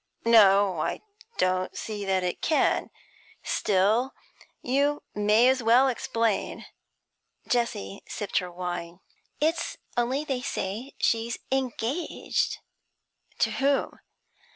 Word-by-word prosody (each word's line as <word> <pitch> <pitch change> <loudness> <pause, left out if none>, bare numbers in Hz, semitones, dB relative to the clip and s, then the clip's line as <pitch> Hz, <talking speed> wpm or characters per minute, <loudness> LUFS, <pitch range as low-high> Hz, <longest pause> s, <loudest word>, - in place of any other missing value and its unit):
'No, 200 -5 +6
I - - -2 0.4
don't 185 0 0
see 210 -2 -5
that 190 -1 +1
it 180 - -3
can. 310 - +2 0.5
Still, 215 +7 +1 0.5
you 285 +3 +1
may 210 +3 +4
as 260 0 +3
well 240 +4 +5
explain.' 230 -3 -1 0.8
Jessie 235 - -1
sipped 205 -2 -1
her 180 -2 -6
wine. 175 0 -5 0.4
'It's 325 +2 0 0.2
only 245 +4 +1
that 305 - -10
they 260 -3 -1
say 230 +4 -4
she's 230 0 +1
engaged.' 265 +4 -1 0.8
'To - - +2
whom?' 275 0 0
225 Hz, 105 wpm, -27 LUFS, 190-260 Hz, 0.8 s, No